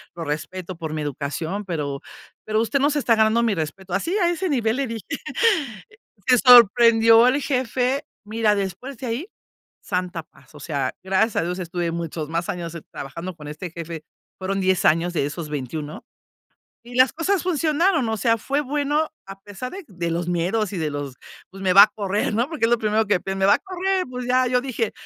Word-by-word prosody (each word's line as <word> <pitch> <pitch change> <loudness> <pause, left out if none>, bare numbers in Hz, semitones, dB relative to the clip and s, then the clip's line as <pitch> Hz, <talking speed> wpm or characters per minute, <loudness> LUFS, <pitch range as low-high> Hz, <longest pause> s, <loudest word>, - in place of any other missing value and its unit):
lo 170 - -5
respeto 175 +5 -5
por 160 -2 -5
mi 155 - -3
educación, 150 +7 -4
pero, 145 -6 -3 0.4
pero 215 0 0
usted 275 +5 0
no 285 - +3
se 295 0 0
está 235 -4 +3
ganando 220 +2 +3
mi 220 -4 +1
respeto". 175 +4 -5
Así 335 - 0
a 350 -3 +3
ese 350 +1 -1
nivel 235 -4 +1
le 275 -2 -1
dije. 225 -2 -6 1.2
Se 250 -1 +6
sorprendió 230 -1 +7
el 275 +3 +2
jefe. 260 0 0 0.2
Mira, 215 0 +1
después 200 +7 -4
de 255 - -6
ahí, 245 +11 -3 0.5
santa 180 -3 -3
paz. 140 -1 -22
O - - -11
sea, 140 -4 -2
gracias 195 +4 +1
a - - +2
Dios, 180 +2 -3
estuve 175 -1 -3
muchos 165 -2 -4
más 170 +1 -2
años 170 -1 -4
trabajando 170 +6 -7
con 150 -2 -11
este 155 +3 -7
jefe. 165 -2 -7 0.4
Fueron 195 +1 -2
10 185 -1 +1
años 165 +3 +3
de 150 - 0
esos 150 +1 -5
21. 150 +2 -5 0.8
Y 245 +1 -12
las 255 -1 +5
cosas 360 +3 0
funcionaron. 320 -3 +1
O 220 - -1
sea, 230 +1 +2
fue 280 +6 -1
bueno, 295 +2 0 0.2
a 195 0 -9
pesar 205 +5 -7
de 390 -1 -7
de 175 -4 -4
los 170 +1 -2
miedos 190 +4 0
y - - -3
de 155 - -1
los: 145 -2 -5 0.4
"Pues, 195 +1 -9
me 185 -1 +3
va 200 +1 +11
a - - +4
correr", 205 0 -1
¿no? 240 +4 +1
Porque 310 -8 0
es 230 - 0
lo 240 - +5
primero 215 0 +1
que 195 -3 +2
pien 195 0 -4
"Me 190 - +3
va 200 - +6
a - - -4
correr", 380 0 -1
pues, 250 -1 -5
ya, 255 0 +3
yo 250 0 +2
dije, 240 -5 -2
205 Hz, 205 wpm, -23 LUFS, 170-250 Hz, 1.2 s, va